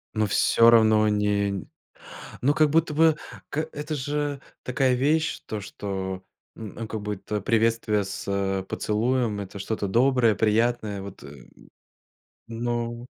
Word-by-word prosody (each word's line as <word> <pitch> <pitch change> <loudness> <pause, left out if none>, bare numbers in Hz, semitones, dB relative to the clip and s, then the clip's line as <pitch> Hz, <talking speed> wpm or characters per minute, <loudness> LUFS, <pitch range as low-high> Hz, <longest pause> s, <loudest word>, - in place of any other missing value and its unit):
Ну, 110 -1 +1
всё 115 +3 +4
равно 110 -2 +5
не 105 -1 +1
нь 95 -4 -5 0.7
Ну, 140 +4 +3
как 155 -1 +4
будто 160 -1 +2
бы, 160 -1 +4 0.3
к - - -6 0.2
это 150 +1 -5
же 145 0 -2 0.2
такая 130 0 +1
вещь, 155 +5 +1
то, 110 - -4
что, 95 -1 -5 0.3
н 110 +1 -7
как 110 -1 -5
будто 105 0 -4
приветствие 110 -2 +1
с 95 -1 -2
поцелуем- 110 0 0
это 100 +1 -8
что-то 100 0 -3
доброе, 125 0 +3
приятное. 110 -1 +1
Вот, 100 -1 -10
эм. 70 -3 -13 1.0
Ноу 120 +1 -3
110 Hz, 130 wpm, -25 LUFS, 100-125 Hz, 1.0 s, равно